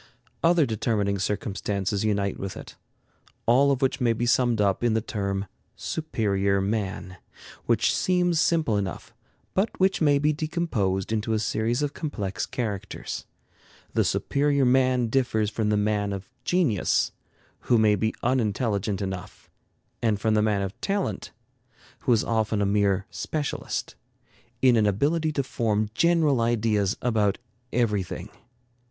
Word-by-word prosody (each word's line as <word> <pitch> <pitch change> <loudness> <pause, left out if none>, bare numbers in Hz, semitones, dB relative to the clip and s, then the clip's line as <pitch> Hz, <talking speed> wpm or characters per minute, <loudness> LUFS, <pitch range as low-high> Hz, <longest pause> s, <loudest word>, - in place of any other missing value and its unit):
Other 165 -2 +5
determining 105 -3 0
circumstances 100 0 -2
unite 100 -2 0
with 95 -1 -5
it, - - -10 0.7
all 130 +4 +5
of 135 0 0
which 135 +1 0
may 120 -2 +3
be 120 +2 -2
summed 120 -1 +2
up 100 +1 +1
in 115 -2 +2
the - - +3
term 100 -3 -3 0.3
"superior 100 -10 0
man," 95 -2 -3 0.5
which - - +2
seems 175 -3 +2
simple 155 -11 +2
enough, 95 -3 -4 0.4
but 195 +4 +2
which 190 -1 +2
may 145 -2 +4
be 150 +2 +2
decomposed 145 - -1
into 110 0 0
a - - +2
series 110 +5 0
of 145 -1 -2
complex 105 - -3
characters. 105 -6 -4 0.7
The - - +3
superior 140 -1 +1
man 130 -1 +3
differs 110 -3 0
from 110 -1 -1
the 105 - +2
man 105 -1 0
of 95 -1 -6 0.2
genius, 160 - +1 0.5
who 120 - +2
may 110 -1 +4
be 110 +3 -1
unintelligent 105 -4 0
enough, 95 -2 -7 0.5
and 110 -3 +1
from 110 0 +1
the 105 - +3
man 105 -2 +1
of 95 0 -6
talent, 195 - -2 0.7
who - - 0
is 115 -2 +4
often 110 -2 0
a 100 - +2
mere 100 -1 +2
specialist, 150 -2 -3 0.7
in 125 -2 +6
an 105 -1 +3
ability 155 - +1
to 140 - 0
form 110 -4 -1
general 160 -4 +3
ideas 110 -3 +1
about 110 -5 +2 0.3
everything. 105 -5 -1
110 Hz, 140 wpm, -26 LUFS, 100-130 Hz, 0.7 s, in